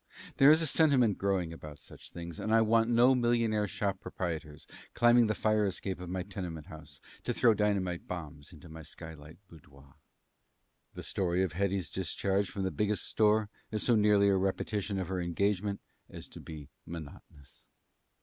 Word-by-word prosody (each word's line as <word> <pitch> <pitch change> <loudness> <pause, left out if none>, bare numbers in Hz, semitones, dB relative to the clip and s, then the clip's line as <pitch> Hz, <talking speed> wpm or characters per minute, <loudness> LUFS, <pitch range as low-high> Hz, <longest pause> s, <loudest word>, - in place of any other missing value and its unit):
There 135 - +7
is 160 +2 +6
a - - +2
sentiment 135 - +3
growing 95 -4 0
about 75 -3 -10
such - - -13
things, 85 -1 -8
and 110 - -3
I 115 0 +5
want 115 +1 +3
no 120 +2 +5
millionaire 115 -4 +1
store 100 +1 -1
proprietors 80 -5 -6 0.3
climbing 120 -1 +5
the 105 - 0
fire 110 -1 +2
escape 95 -1 -3
of 90 -1 -7
my 90 0 -2
tenement 90 -6 -6
house 75 -3 -12 0.2
to - - -1
throw 115 -2 +5
dynamite 100 -4 -1
bombs 80 -3 -7
into 80 -1 -14
my 80 0 -10
skylight 80 0 -10
boudoir. 70 -4 -17 1.0
The - - -7
story 90 -1 0
of 90 -4 -2
Hetty's 95 -2 -1
discharge 95 +2 -1
from 100 - -4
the 95 - -1
Biggest 105 0 -1
Store 105 -1 +2 0.2
is 110 -1 -2
so 120 - +3
nearly 105 -2 +4
a 95 - +3
repetition 100 +1 -2
of 95 -2 -2
her 95 -1 -2
engagement 100 +3 -1 0.3
as - - -9
to - - -11
be 75 -3 -10 0.2
monotonous. 75 -3 -11
95 Hz, 170 wpm, -31 LUFS, 85-105 Hz, 1.0 s, There